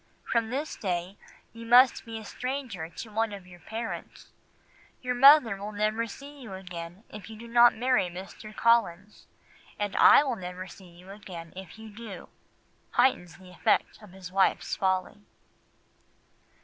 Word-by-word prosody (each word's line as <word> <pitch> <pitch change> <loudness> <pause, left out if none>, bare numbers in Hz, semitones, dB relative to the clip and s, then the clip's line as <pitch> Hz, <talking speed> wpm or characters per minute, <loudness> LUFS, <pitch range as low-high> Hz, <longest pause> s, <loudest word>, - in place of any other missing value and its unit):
From 230 -2 0
this 280 +5 -3
day 180 -1 -3 0.4
you 230 0 -10
must 245 +2 +5
be 225 -1 -6
a 220 - -9
stranger 250 -10 -5
to 220 +5 -9
one 225 +1 0
of 200 -3 -9
your 180 -1 -15
parents. 225 +5 -7 0.7
Your 250 0 -1
mother 250 -4 +7
will 205 +2 -6
never 215 +2 0
see 280 +6 -11
you 210 -6 -8
again 180 0 -9
if 210 +1 -10
you 220 - -9
do 235 +2 -10
not 235 +1 +6
marry 245 -4 +2
Mr. 190 +4 -10
Collins, 210 -4 +1 0.5
and 205 -1 -3
I - - +8
will 260 -5 -2
never 180 0 -7
see 185 0 -14
you 180 +3 -14
again 180 -5 -10
if 190 +1 -10
you 220 0 -10
do,'" 210 -3 -10 0.6
heightens 180 -9 +2
the 185 -1 -15
effect 210 +5 0
of 210 -3 -14
his 185 -1 -10
wife's 195 0 +1
folly. 190 +1 -1
210 Hz, 160 wpm, -28 LUFS, 185-235 Hz, 0.7 s, I